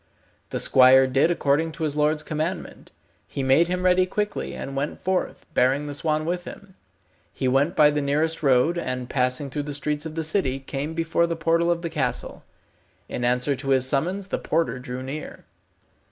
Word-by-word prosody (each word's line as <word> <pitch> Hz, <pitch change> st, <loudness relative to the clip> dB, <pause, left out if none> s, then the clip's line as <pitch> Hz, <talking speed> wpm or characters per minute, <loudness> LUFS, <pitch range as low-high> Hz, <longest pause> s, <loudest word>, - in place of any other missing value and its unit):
The -, -, -3 dB
squire 130 Hz, +1 st, +6 dB
did 135 Hz, +5 st, +2 dB
according 160 Hz, -1 st, +1 dB
to 165 Hz, 0 st, -5 dB
his 150 Hz, -2 st, -1 dB
lord's 150 Hz, 0 st, +1 dB
commandment. 155 Hz, +4 st, -4 dB, 0.4 s
He 135 Hz, -, -4 dB
made 135 Hz, +6 st, +4 dB
him 180 Hz, +1 st, -2 dB
ready 185 Hz, 0 st, +4 dB
quickly, 210 Hz, +2 st, -3 dB
and 135 Hz, -, -6 dB
went 140 Hz, +2 st, -3 dB
forth, 185 Hz, 0 st, -2 dB
bearing 135 Hz, +3 st, +2 dB
the 145 Hz, -, -5 dB
swan 155 Hz, +1 st, -1 dB
with 175 Hz, +2 st, -2 dB
him. 200 Hz, -2 st, -11 dB, 0.6 s
He 130 Hz, -, -2 dB
went 135 Hz, +6 st, +2 dB
by 150 Hz, -1 st, +6 dB
the 150 Hz, 0 st, -1 dB
nearest 155 Hz, +4 st, 0 dB
road, 140 Hz, +5 st, +3 dB
and 125 Hz, -5 st, -4 dB
passing 130 Hz, +1 st, 0 dB
through 145 Hz, -, -2 dB
the 145 Hz, -, -2 dB
streets 150 Hz, +1 st, -2 dB
of 155 Hz, -, -9 dB
the 165 Hz, -, -2 dB
city, 155 Hz, -5 st, 0 dB
came 140 Hz, +4 st, -5 dB
before 165 Hz, +1 st, +1 dB
the 170 Hz, -, -2 dB
portal 165 Hz, +1 st, +1 dB
of 170 Hz, 0 st, 0 dB
the 170 Hz, -, -2 dB
castle. 135 Hz, -6 st, -3 dB, 0.6 s
In 120 Hz, -, -4 dB
answer 125 Hz, +3 st, +1 dB
to 135 Hz, +1 st, -5 dB
his 130 Hz, -1 st, +4 dB
summons 180 Hz, +8 st, -1 dB
the -, -, -2 dB
porter 160 Hz, -5 st, -1 dB
drew 125 Hz, 0 st, -6 dB
near. 145 Hz, +4 st, -7 dB
150 Hz, 190 wpm, -24 LUFS, 135-165 Hz, 0.6 s, squire